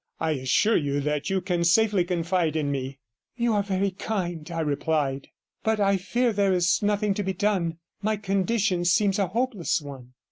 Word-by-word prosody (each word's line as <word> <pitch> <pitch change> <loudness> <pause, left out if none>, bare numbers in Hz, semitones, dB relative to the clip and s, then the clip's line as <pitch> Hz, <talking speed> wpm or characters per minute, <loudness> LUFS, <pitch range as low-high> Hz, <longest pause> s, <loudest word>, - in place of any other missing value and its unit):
I 160 - 0
assure 145 - +2
you 145 -2 -1
that 150 +4 -2
you 190 -1 0
can 175 -2 -1
safely 200 +2 +3
confide 175 -2 0
in 150 -3 0
me.' 135 0 -4 0.4
'You 235 -1 +1
are 205 - +2
very 195 0 -1
kind,' 175 -5 -4
I 165 -1 -2
replied. 145 -2 -1 0.4
'But 220 -1 +1
I 200 -1 +3
fear 240 +5 0
there 200 -2 +2
is 175 -2 +2
nothing 205 0 +1
to 205 - -2
be 190 -1 -2
done. 185 -4 0 0.2
My 215 +1 0
condition 195 -1 0
seems 195 +4 +2
a 195 - +2
hopeless 215 -5 -1
one.' 135 -4 -11
185 Hz, 180 wpm, -25 LUFS, 160-205 Hz, 0.4 s, safely